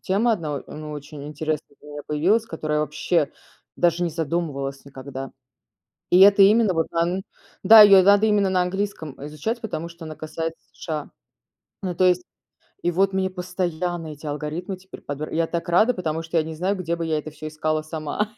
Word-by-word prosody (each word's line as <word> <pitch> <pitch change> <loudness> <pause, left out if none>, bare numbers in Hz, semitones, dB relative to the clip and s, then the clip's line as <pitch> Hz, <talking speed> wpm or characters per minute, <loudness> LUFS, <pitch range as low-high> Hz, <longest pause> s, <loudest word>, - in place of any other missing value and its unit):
тема 215 +5 +1
одна, 155 -8 -2
а, - - -11
ну 155 0 -7
очень 145 0 -8
интересная 150 -1 -4
для 150 - -13
меня 145 0 -7
появилась, 180 +10 +2
которая, 155 -4 -2
вообще, 150 +1 0 0.5
даже 175 0 +2
не 175 - 0
задумывалась 150 -4 -3
никогда. 135 -1 -8 0.8
И 180 - +6
это 200 +1 +8
именно, 210 0 +5
вот 165 -2 0
дан 175 +3 0 0.4
да, 220 -1 +10
ее 200 -2 +8
надо 200 +2 +5
именно 205 -2 +3
на 185 -1 +2
английском, 185 -5 -3
э, 145 - -6
изучать, 155 +11 -4
потому 170 -7 -4
что 170 -1 -11
она 155 - -7
касается 165 +1 -5
США. 155 -3 -5 0.7
Ну, 185 -2 -2
то 185 - +3
есть 180 0 +3 0.6
и 175 - +1
вот 195 +3 +2
мне 190 0 0
постоянно 180 -2 -3
эти 150 0 -10
алгоритмы 155 +6 -4
теперь 190 +1 -13
подбир 145 +2 -5
я 165 0 +1
так 170 0 -3
рада, 215 +8 +4
потому 165 -5 -3
что 165 +1 -2
я 160 - +3
не 160 0 -7
знаю, 190 +5 -1
где 170 -2 -2
бы 170 - -3
я 160 -1 0
это 155 - -7
всё 155 +1 -8
искала 155 0 -1
сама. 155 +7 -4
165 Hz, 195 wpm, -23 LUFS, 155-185 Hz, 0.8 s, да